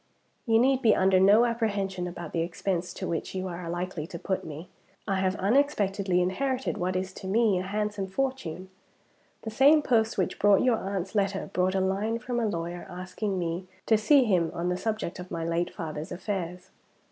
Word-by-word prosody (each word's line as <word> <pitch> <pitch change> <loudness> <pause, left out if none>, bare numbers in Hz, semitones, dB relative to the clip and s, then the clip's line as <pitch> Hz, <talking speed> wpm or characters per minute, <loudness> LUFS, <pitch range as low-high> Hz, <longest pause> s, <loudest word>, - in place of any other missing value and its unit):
"You 225 -1 +5
need 260 +2 +3
be 225 -4 +5
under 190 0 +4
no 205 +5 +6
apprehension 200 -6 -1
about 175 -1 -7
the 170 - 0
expense 175 +1 -2
to - - -4
which 170 +3 -3
you 185 0 -2
are 175 -1 -6
likely 175 -2 -4
to 170 - -7
put 190 +2 -2
me. 160 +3 -8 0.4
I 195 -2 +1
have 190 0 +1
unexpectedly 200 -5 +2
inherited 260 +8 -1
what 180 +1 -1
is 185 +1 -2
to 190 - -8
me 210 -1 +3
a - - -2
handsome 205 +1 -2
fortune. 190 -6 -3 0.7
"The 220 - -4
same 290 +6 +5
post 225 -3 +2
which 185 - -1
brought 205 -1 +5
your 250 -3 +3
aunt's 195 -2 -4
letter 195 -2 -1
brought 185 +1 +1
a 190 - +2
line 200 +4 0
from 245 0 -3
a 230 - +1
lawyer 175 -2 -4
asking 185 +2 -4
me 175 +1 -3 0.2
to 220 - +4
see 265 +6 +5
him 180 -8 +2
on 175 +1 -1
the 180 - 0
subject 215 -4 -3
of 180 0 -8
my 165 -1 -3
late 170 +1 0
father's 155 -2 -6
affairs. 180 -1 -4
190 Hz, 195 wpm, -27 LUFS, 180-220 Hz, 0.7 s, no